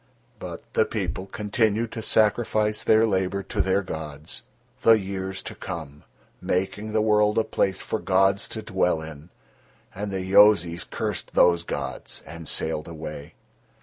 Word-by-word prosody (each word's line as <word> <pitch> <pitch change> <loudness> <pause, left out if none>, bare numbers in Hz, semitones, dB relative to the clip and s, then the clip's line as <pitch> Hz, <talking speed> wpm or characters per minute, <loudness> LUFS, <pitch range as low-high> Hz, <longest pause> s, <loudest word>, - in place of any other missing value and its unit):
But - - -7
the - - +4
people 95 - -3
continued 110 +1 0
to 115 - -5
sacrifice 105 -1 +2
their 110 +1 +5
labour 95 -1 0
to 105 -1 -2
their 95 +1 +1
gods, 75 -3 -7 0.4
the 115 - +7
years 95 -1 -4
to - - -5
come, 75 -3 -7 0.4
making 100 +4 -2
the 110 0 +2
world 105 -1 +3
a 110 - +4
place 95 -3 -1
for 110 - -3
gods 95 +1 +2
to 110 - -6
dwell 90 -4 0
in, 80 +1 -10 0.6
and 100 +2 -4
the 95 -1 -2
Yozis 95 -3 +5
cursed - - -4
those 85 -1 +5
gods - - -5
and 85 -1 -9
sailed 75 0 -1
away. 75 -3 -8
95 Hz, 150 wpm, -25 LUFS, 85-105 Hz, 0.6 s, the